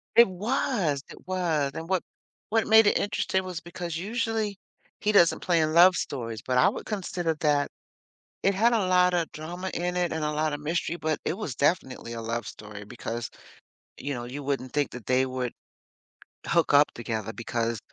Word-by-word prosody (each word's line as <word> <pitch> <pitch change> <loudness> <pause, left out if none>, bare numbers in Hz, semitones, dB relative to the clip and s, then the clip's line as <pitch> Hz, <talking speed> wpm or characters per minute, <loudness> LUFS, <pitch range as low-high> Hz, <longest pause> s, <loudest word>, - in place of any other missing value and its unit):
It 235 -2 +8
was! 190 - 0
It - - -13
was, 165 -7 0
and 160 +1 -6
what 185 -2 +1 0.5
what 225 0 +2
made 220 0 +7
it - - +4
interesting 190 -2 0
was 180 -3 -5
because, 175 -1 -6
usually, 220 0 -2 0.4
he 210 - +1
doesn't 175 -4 +5
play 175 -3 +2
in 155 0 +1
love 180 +2 +8
stories, 115 -6 -4
but 125 -1 +1
I 125 - +6
would - - -6
consider 180 -5 -2
that 145 -2 +1 0.7
it 195 - +4
had 230 +5 +3
a 210 -5 +2
lotta 180 -2 +4
drama 175 +4 -5
in 180 +1 -2
it 175 -2 0
and 160 0 -2
a 150 - 0
lotta 150 -1 0
mystery, 165 +3 -2
but 155 -2 -1
it - - 0
was 155 - -4
definitely 135 -6 0
a 115 - -5
love 115 +1 -3
story 105 -1 -9
because, 120 +1 -5 0.7
you 140 +1 -4
know, 120 0 -5
you 135 +4 -6
wouldn't 135 -2 -2
think 145 -2 +1
that 125 -4 -9
they 130 +1 +3
would 130 -2 -3 0.9
hook 170 -3 +2
up 145 +1 +6
together 110 -2 -4
because 115 -1 -2
160 Hz, 185 wpm, -27 LUFS, 130-185 Hz, 0.9 s, It